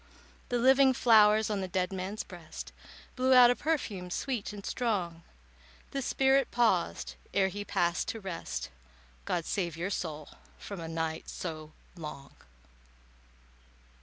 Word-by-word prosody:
The 245 - +1
living 265 +2 +5
flowers 215 -3 +5
on 200 -2 -1
the 190 - -3
dead 180 +1 -1
man's 190 +3 -4
breast 175 -4 -9 0.4
Blew 260 0 +4
out 245 -1 +9
a - - +1
perfume 225 - -2
sweet 235 +3 -3
and 205 -1 -9
strong. 185 -9 -1 0.7
The 275 - -2
spirit 270 0 +3
paused 235 -1 +1 0.2
ere 190 -1 +3
he 205 +2 -5
passed 175 -3 0
to 225 - -3
rest— 170 - -5 0.6
"God 170 - -1
save 170 -5 -2
your 180 +4 -2
soul 155 -5 -4 0.3
from 200 -3 -7
a 165 - -5
night 160 -1 -3
so 155 -3 -6 0.2
long." 150 -5 -8
195 Hz, 135 wpm, -30 LUFS, 170-240 Hz, 0.7 s, out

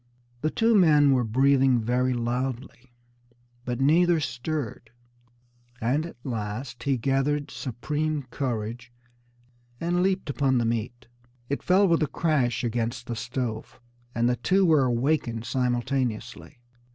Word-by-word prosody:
The 155 - +1
two 225 +7 +2
men 150 -8 +5
were 125 -2 +2
breathing 130 +2 +3
very 125 +3 0
loudly, 125 +1 -4 0.7
but 125 0 -3
neither 165 +5 +4
stirred; 130 -3 -4 0.9
and 140 +8 0
at - - -12
last 115 +1 -5
he 135 -2 0
gathered 135 +4 0
supreme 150 +4 -3
courage, 120 -2 -4 0.9
and 175 +1 0
leaped 190 0 0
upon 135 -2 +1
the 120 - +1
meat. 120 +2 -3 0.4
It 140 - -2
fell 195 +2 +4
with 165 -2 +2
a 155 - +2
crash 140 -7 0
against 120 +1 -2
the 120 - -4
stove, 120 -2 -4 0.4
and 120 +1 +2
the 125 0 +1
two 190 +10 +2
were 155 -5 +4
awakened 120 -2 0
simultaneously. 125 -2 -2
130 Hz, 125 wpm, -26 LUFS, 120-150 Hz, 0.9 s, men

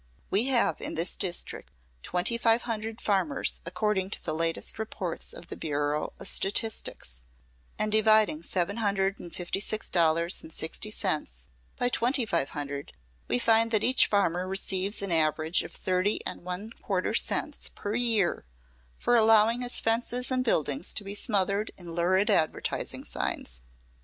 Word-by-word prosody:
We 205 +5 +3
have, 260 -3 +2
in - - -3
this 165 +3 +1
district, 180 -3 -3 0.3
twenty 180 - -1
five 230 0 +2
hundred 225 -1 -4
farmers 205 +8 0
according 210 -3 -1
to - - -2
the - - -2
latest 165 +5 -1
reports 195 -5 -5
of - - -9
the - - -8
Bureau 145 0 -2
of - - -3
Statistics, 195 - 0 0.5
and 215 - -1
dividing 215 -6 +4
seven 180 +4 -1
hundred 195 -2 0
and 175 - -9
fifty 175 +3 -3
six 215 +1 0
dollars 170 0 +2
and - - -12
sixty 160 +6 -2
cents 150 - -2 0.3
by 245 - +1
twenty 250 +1 +2
five 170 -9 0
hundred, 140 -1 -5 0.3
we 120 - +1
find 225 - +3
that 220 -2 +1
each 255 +1 +5
farmer 185 -3 +1
receives 195 +1 0
an 195 - -2
average 160 +1 +2
of - - -8
thirty 185 +3 0
and - - -5
one 180 +5 -5
quarter 185 -3 -1
cents - - 0
per 205 - -4
year 225 -6 +2 0.5
for 245 - +1
allowing 225 +1 +5
his 245 0 +2
fences 240 +3 0
and 255 0 +1
buildings 150 - 0
to 210 - 0
be 200 0 -5
smothered 205 -1 +1
in 175 -2 -9
lurid 185 +5 +2
advertising 160 -6 0
signs. - - -3
195 Hz, 155 wpm, -28 LUFS, 170-220 Hz, 0.5 s, each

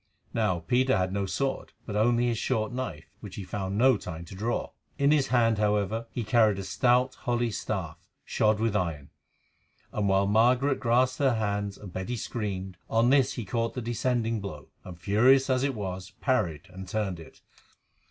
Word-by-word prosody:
Now, 95 -7 0
Peter 130 +9 +2
had 95 0 -1
no 100 -1 -1
sword, 135 +7 -2
but 105 - -5
only 120 +3 +3
his 120 -2 0
short 110 -4 -1
knife, 90 -12 -4
which 105 -4 -9
he 100 - -5
found 95 +1 -4
no 130 0 +5
time 85 -3 -7
to 85 - -11
draw. 110 +5 -2 0.3
In 140 +1 +3
his 150 -3 +3
hand, 115 -3 +2
however, 105 +2 0
he 120 - -4
carried 110 -3 +3
a 100 - -4
stout 125 +4 +2
holly 120 -1 -1
staff 95 -7 -4 0.2
shod 105 0 +2
with 110 -2 0
iron, 80 -7 -2 0.8
and, 100 -2 0
while 95 0 +3
Margaret 125 +6 +3
clasped 125 +2 +2
her 135 -4 +3
hands 100 -2 -2
and 95 -4 -11
Betty 95 +6 -3
screamed, 95 -5 -4
on 115 +2 +3
this 135 -1 +4
he 120 - -5
caught 115 +3 -2
the - - -2
descending 115 -1 -1
blow, 75 -8 -8
and, 90 -2 -10
furious 130 +9 +4
as 130 0 +2
it 140 -2 0
was, 95 -3 -5
parried 100 - 0
and 95 0 -9
turned 100 -4 -2
it. 80 - -14
110 Hz, 180 wpm, -28 LUFS, 95-120 Hz, 0.8 s, no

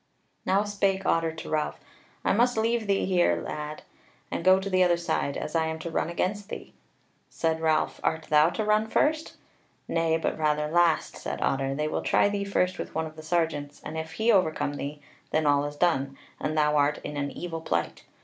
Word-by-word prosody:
Now 195 +2 +3
spake 195 -2 0
Otter 165 -1 +2
to 160 - -8
Ralph: 155 -1 -1 0.5
"I - - +3
must 240 +3 +3
leave 225 0 +1
thee 195 -1 +2
here, 175 - +3
lad, 150 - -6 0.5
and - - -3
go 185 +1 +6
to 190 - -5
the 185 -1 +2
other 175 -1 +3
side, 170 -4 -1
as 150 - -5
I 160 -1 +2
am 160 0 -3
to 165 +1 -6
run 165 - 0
against 200 +4 -2
thee." - - -8 0.6
Said 160 -1 -1
Ralph: 160 -1 +1
"Art 160 0 0
thou 150 +1 +4
to 215 +4 -2
run 215 +1 +2
first?" 310 +7 +1 0.5
"Nay, 165 -1 +1
but 160 - -2
rather 150 -1 +1
last," 170 0 +2
said - - -5
Otter; 135 0 0
"they 150 +1 -1
will - - -2
try - - +3
thee 205 -1 -2
first 185 -2 0
with - - -6
one 160 0 0
of 155 0 -9
the 155 - -9
sergeants, 155 -3 -1
and - - -6
if 160 0 -5
he 225 +2 +2
overcome 160 -7 +2
thee, 145 +1 -6 0.3
then 155 0 +1
all 145 0 +3
is 145 0 -5
done, 140 -5 +1 0.2
and 155 +1 -2
thou 150 0 +3
art 145 +1 +3
in 150 - -5
an 140 0 -2
evil 165 +1 -5
plight. 85 - -2
160 Hz, 205 wpm, -27 LUFS, 150-190 Hz, 0.6 s, go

